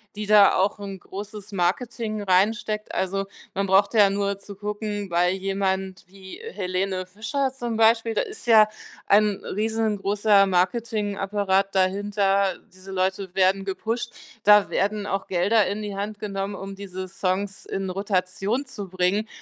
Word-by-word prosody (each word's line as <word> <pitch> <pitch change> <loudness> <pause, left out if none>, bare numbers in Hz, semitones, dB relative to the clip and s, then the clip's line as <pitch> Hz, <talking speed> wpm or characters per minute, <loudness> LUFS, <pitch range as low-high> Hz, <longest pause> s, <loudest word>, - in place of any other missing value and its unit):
die 210 0 -5
da 210 -1 +7
auch 195 +2 +1
'n 195 -2 -7
großes 205 +2 -9
Marketing 215 +4 -1
reinsteckt, 210 +3 +1
also, 195 +1 -1 0.3
man 195 - 0
brauchte 200 +3 +3
ja 200 -2 +6
nur 200 0 -1
zu 200 0 -11
gucken, 205 -1 -4
bei 175 +1 +2
jemand 190 0 -2
wie 190 0 -11 0.2
Helene 185 0 -2
Fischer 220 +8 -2
zum 240 -3 -4
Beispiel, 225 0 +3
da - - +1
ist 415 -6 -7
ja 220 -3 +6 0.4
ein 205 0 +3
riesengroßer 210 -1 +2
Marketingapparat 195 0 0
dahinter, 195 0 +1
diese 185 +1 -12
Leute 190 0 -1
werden 195 +1 +2
gepusht. 225 +5 -3 0.3
Da 210 0 +6
werden 205 +1 -1
auch 195 -1 -2
Gelder 195 +4 +2
in 205 +3 -3
die 205 -1 -5
Hand 205 +1 -4
genommen, 195 -1 -3
um 195 0 -7
diese 190 -1 -7
Songs 190 +2 -2
in 195 -1 -3
Rotation 195 +6 -1
zu 205 -7 -7
bringen. 185 +4 0
200 Hz, 145 wpm, -24 LUFS, 190-210 Hz, 0.4 s, da